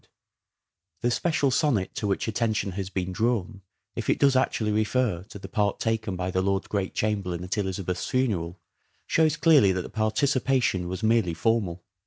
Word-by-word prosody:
Oxford - - -33
and 85 -1 -55
The 120 - +1
special 155 -5 +1
sonnet 130 - +1
to 105 - -3
which 100 - -1
attention 110 -2 0
has 95 0 -4
been 95 -2 -3
s - - -8
drawn, 110 -3 -1 0.3
if - - -4
it - - +3
does 140 -1 +4
actually 110 -4 +1
refer 110 -2 +1
to - - -9
the 100 - -9
part 105 -1 0
taken 110 -3 -1
by 90 0 -3
the 95 - +1
Lord 95 0 0
Great 100 -2 -2
Chamberlain 95 -5 -1
at 90 - -3
Elizabeth's 95 -2 -2
funeral 95 -9 -1 0.5
shows 160 -1 +2
clearly 155 - +5
that 90 -1 -2
the - - -8
participation 115 -3 +1
was 95 +4 -5
merely 110 -6 +2
formal. 95 -4 0
105 Hz, 185 wpm, -26 LUFS, 95-115 Hz, 0.5 s, clearly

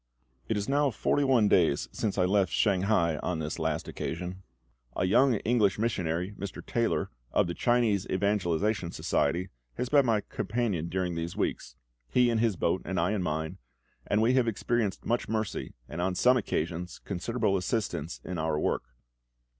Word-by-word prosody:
It 110 - 0
is 100 - -2
now 145 +1 +3
forty 140 +4 +1
one 130 -6 +4
days 85 -7 +3
since 105 -3 -2
I 90 - +3
left 95 -1 +2
Shanghai 95 -5 +2
on 90 - -2
this 80 +1 -4
last 80 0 -1
occasion. 90 +3 -5 0.5
A - - +1
young 125 +7 +4
English 110 -4 +2
missionary, 90 -5 -1
Mr. 100 -1 -6
Taylor, 115 -1 0 0.2
of - - +3
the 85 - -3
Chinese 115 -3 +2
Evangelisation 95 -1 0
Society, 90 +2 0 0.3
has 125 - -2
been 140 -2 +4
my 110 -3 +3
companion 100 -10 -2
during 90 0 -1
these 85 +1 -4
weeks - - -2 0.3
he 125 -1 +4
in 115 - +1
his 110 -3 +2
boat, 85 +1 0
and 95 -2 -2
I 85 +4 +2
in 105 -3 0
mine 80 +2 -3 0.5
and 105 +2 +2
we 120 +3 +4
have 130 -2 +3
experienced 115 -2 -1
much 120 -2 0
mercy, 110 -2 -3
and 85 - -5
on 90 +1 0
some 125 +7 +5
occasions 90 -6 -2
considerable 105 +2 -1
assistance 95 -4 -2
in 90 -2 -4
our 80 -1 0
work. - - 0
100 Hz, 170 wpm, -29 LUFS, 85-115 Hz, 0.5 s, some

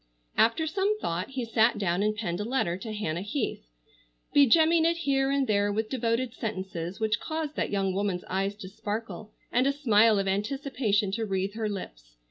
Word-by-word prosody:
After 230 +8 +3
some 390 +6 0
thought 170 - -2
he 260 -2 -3
sat 225 +1 +3
down 180 -2 0
and 215 +1 +1
penned 175 -5 -3
a - - -1
letter 225 -7 0
to 205 +4 -6
Hannah 180 -6 -2
Heath, 215 +5 -2 0.7
begemming 320 +4 +5
it 335 +1 +2
here 275 -4 +1
and 275 -1 +2
there 205 -2 +2
with 215 +1 -2
devoted 240 -1 0
sentences 190 -6 -5
which 220 -1 +1
caused 315 -2 -4
that - - 0
young 195 -2 0
woman's 195 -2 -1
eyes 195 +2 -2
to 205 -2 -9
sparkle 215 +2 -5 0.2
and 250 +3 +3
a - - +4
smile 225 -6 +4
of 195 0 0
anticipation 210 -1 0
to 225 +2 -1
wreathe 195 0 -1
her 220 -1 -2
lips. - - -8
215 Hz, 185 wpm, -28 LUFS, 195-270 Hz, 0.7 s, begemming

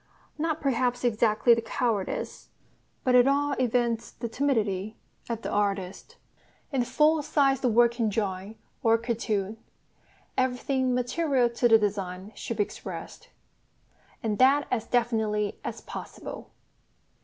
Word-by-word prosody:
not 320 0 0
perhaps 250 -2 0
exactly 230 0 +4
the 230 - +1
cowardice, 225 -3 -2 0.5
but 255 - +2
at 250 +1 +6
all 285 +1 +2
events 240 -2 +1
the 235 - -6
timidity, 220 -5 -1 0.3
of 230 -1 -3
the - - -3
artist. 195 -2 -2 0.5
In 270 -3 +1
a - - -1
full 310 +4 +3
sized 275 -2 +2
working 235 -1 +3
drawing 200 0 -3 0.2
or 225 0 +4
cartoon 225 -3 -2 0.8
everything 255 0 0
material 250 0 +1
to 240 +1 +2
the 225 -1 +7
design 195 -2 -3
should 230 - -5
be 210 - +4
expressed, - - -9 0.9
and 215 -2 -1
that 275 +3 +5
as 230 -3 -1
definitely 220 -4 0
as - - -5
possible. - - -8
235 Hz, 125 wpm, -27 LUFS, 215-255 Hz, 0.9 s, the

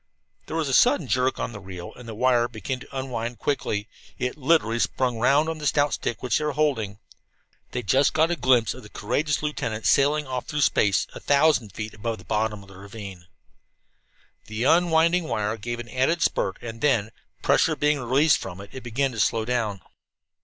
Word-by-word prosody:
There 155 - -5
was 160 -3 0
a 135 - -1
sudden 250 - +4
jerk 130 +1 +1
on - - -2
the 105 - -8
reel 95 -2 -9
and 120 -2 -11
the 110 - -6
wire 120 0 +3
began 120 +3 -5
to 135 +1 -9
unwind 120 -3 -4
quickly. 105 -7 -2 0.3
It 125 0 -2
literally 130 -6 +2
spun 125 0 0
round 140 +6 +3
on 160 -1 -3
the 150 - -2
stout 145 0 +2
stick 115 - -3
which 125 -3 +1
they - - -3
were 150 -1 -1
holding. 125 -10 0 0.7
They 125 - -4
just 135 +7 +3
got 160 +2 +2
a - - +1
glimpse 125 -8 +3
of 130 - -11
the 105 - -13
courageous 145 +10 -1
lieutenant 115 -7 -3
sailing 145 +2 +3
off 130 -2 -4
through 150 -2 -2
space, 100 -8 +3
a - - -8
thousand 140 - +2
feet 110 0 -6
above 115 +1 -4
the - - -13
bottom 105 -1 -1
of 100 - -17
the 95 - -13
ravine. 100 -3 -10 1.2
The 110 +2 -3
unwinding 170 +2 +3
wire 105 -6 -1
gave 120 +2 -5
an 120 -1 -7
added 150 +7 +1
spurt, 95 - 0
and 115 -1 -7
then, 115 -7 +2 0.3
pressure - - +3
being 150 0 +1
released 135 +5 +3
from 95 -1 -7
it, 100 0 -11
it 130 - -7
began 130 +3 -1
to 115 - -6
slow 110 +2 +1
down. 110 -6 -1
125 Hz, 200 wpm, -25 LUFS, 110-145 Hz, 1.2 s, sudden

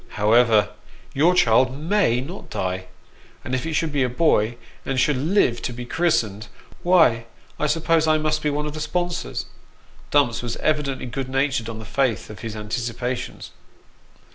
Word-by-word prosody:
However, 110 0 +4 0.4
your 165 +6 +3
child 130 -1 +3
may 155 - +1
not 170 +9 -8
die; 95 0 -3 0.6
and - - -4
if 130 +4 -1
it 160 - -3
should 155 +1 0
be 145 -1 0
a 125 - +2
boy, 120 -5 +2 0.3
and 135 -1 -1
should 145 +3 +3
live 140 - +1
to - - -3
be 120 +1 -7
christened, 110 - 0 0.3
why 160 -11 +4 0.3
I 150 - +1
suppose 160 +1 +2
I 155 0 +4
must 155 0 0
be 150 - 0
one 150 +1 -2
of 150 - -4
the 155 - -6
sponsors." 175 +3 -2 0.6
Dumps 140 -5 +2
was 120 -1 -4
evidently 150 -4 -1
good 130 +2 -4
natured 135 -3 0
on 115 - -6
the 110 - -8
faith 120 -3 -1
of 105 - -11
his 110 -1 -6
anticipations. 120 +3 -4
130 Hz, 165 wpm, -23 LUFS, 115-155 Hz, 0.6 s, However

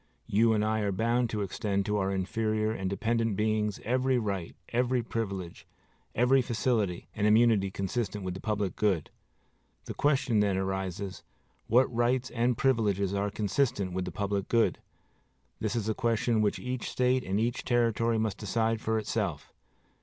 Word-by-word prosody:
You 110 +3 +3
and 105 -1 +1
I 110 0 +1
are 105 -2 0
bound 115 +4 +1
to 105 -2 -2
extend 100 0 -1
to 105 0 0
our 95 -1 0
inferior 110 +3 0
and 95 -4 -3
dependent 115 +1 0
beings 105 0 0
every 130 +2 +1
right, 100 -7 -3
every 125 0 +1
privilege, 100 -7 -5 0.5
every 125 +3 +4
facility 115 -6 -1
and 105 0 +1
immunity 110 -2 +4
consistent 100 +2 -3
with 90 -1 -3
the 95 - -7
public 105 -3 -2
good. 95 -7 0 0.7
The - - -5
question 135 -6 +2
then 100 -2 +2
arises, 95 -1 -3 0.5
What 125 +4 +5
rights 125 +2 +1
and 120 0 +1
privileges 105 -7 +1
are 100 +1 0
consistent 100 -2 0
with 95 0 -2
the - - -5
public 100 -1 -2
good? 115 -1 +2 0.8
This 110 0 -2
is 110 -3 -1
a 110 - +1
question 115 -1 +1
which 105 -1 +1
each 125 -1 -4
State 125 0 +1
and 95 +2 -1
each 120 +2 -1
Territory 115 -1 +1
must 110 -2 -1
decide 110 +1 0
for 110 0 0
itself. 110 - -3
110 Hz, 160 wpm, -29 LUFS, 100-120 Hz, 0.8 s, What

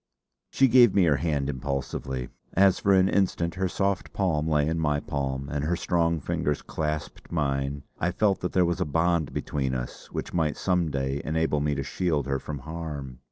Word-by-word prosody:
She 135 - +4
gave 120 -4 +6
me 100 - +5
her 75 -5 +4
hand 75 -4 0
impulsively. 65 -2 -3 0.2
As 95 0 +4
for 100 - +2
an 95 -1 +5
instant 90 -4 +1
her 95 0 -1
soft 100 0 -1
palm 80 -6 0
lay 75 -2 +2
in 80 +1 0
my 75 -2 +1
palm 70 -1 -3
and 75 0 -2
her 85 +4 +1
strong 85 -1 +1
fingers 75 +1 -1
clasped 75 -1 -4
mine, 70 -3 -1 0.2
I 85 - +1
felt 100 +1 +2
that 90 - -3
there 90 -1 +4
was 85 0 -1
a - - +2
bond 80 +1 +1
between 65 -3 -2
us - - -6
which - - -5
might 80 -3 0
some 90 -3 +1
day 70 0 -2
enable 80 -1 0
me 75 0 0
to 70 - -2
shield 75 -3 -1
her 70 0 -1
from 75 +1 -6
harm. 75 -3 -6
75 Hz, 195 wpm, -27 LUFS, 70-85 Hz, 0.2 s, gave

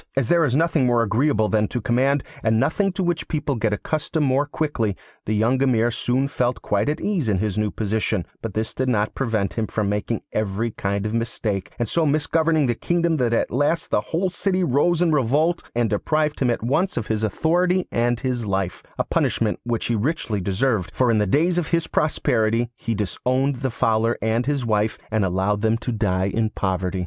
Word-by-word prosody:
As 130 -4 +1
there 170 -1 +4
is 130 -4 +1
nothing 160 -4 +2
more 120 -1 +3
agreeable 115 +1 +2
than 105 -1 +1
to 125 - -3
command, 130 +4 +1 0.2
and 110 -1 +2
nothing 195 - +1
to 190 - -2
which 175 -2 -1
people 150 -3 -1
get 110 -3 0
accustomed 155 +7 -1
more 135 +2 +2
quickly, 130 -10 -1 0.3
the 110 - +1
young 120 +5 +2
Emir 120 -3 +3
soon 125 +4 0
felt 125 -5 -1
quite 105 +5 +1
at 150 - 0
his - - -4
ease 175 - 0
in 100 - +2
his 100 0 -1
new 105 -1 0
position; 110 -2 -1 0.2
but 115 -3 -5
this 110 +1 -2
did 130 0 -1
not 110 -3 0
prevent 110 -6 -1
him 110 -2 -2
from 105 -2 -1
making 105 +2 -2
every 110 +2 -1
kind 100 0 -2
of 110 - -2
mistake, 110 -4 -2
and 120 - -1
so 165 +9 +1
misgoverning 155 +1 +2
the 120 - +1
kingdom 170 +5 0
that 125 -4 +1
at 115 - +1
last 145 +6 0
the - - +2
whole 170 - -1
city 185 0 0
rose 170 +4 +2
in 170 - +2
revolt 150 +5 +2
and 120 -3 +1
deprived 150 +8 0
him 130 - +2
at 120 - -1
once 160 +10 0
of 115 - -1
his 110 0 -2
authority 175 - +1
and 120 0 0
his 125 -3 -1
life 95 -3 -2 0.2
a - - +1
punishment 110 -2 0
which 120 -1 -1
he 120 - 0
richly 110 - -1
deserved, 100 +1 0
for 125 -2 +3
in 110 - +2
the 105 - +1
days 170 - +2
of 165 - -3
his 170 -1 +1
prosperity 120 -7 +1
he 115 -1 -3
disowned 130 +7 0
the 130 +1 -2
Fowler 115 0 +1
and 115 +3 0
his 140 -4 0
wife, 110 -1 +1
and 110 -1 +1
allowed 95 +3 0
them 110 +1 +2
to 120 +2 -4
die 100 -5 0
in 110 +3 0
poverty. 95 -2 -2
120 Hz, 210 wpm, -22 LUFS, 110-150 Hz, 0.3 s, there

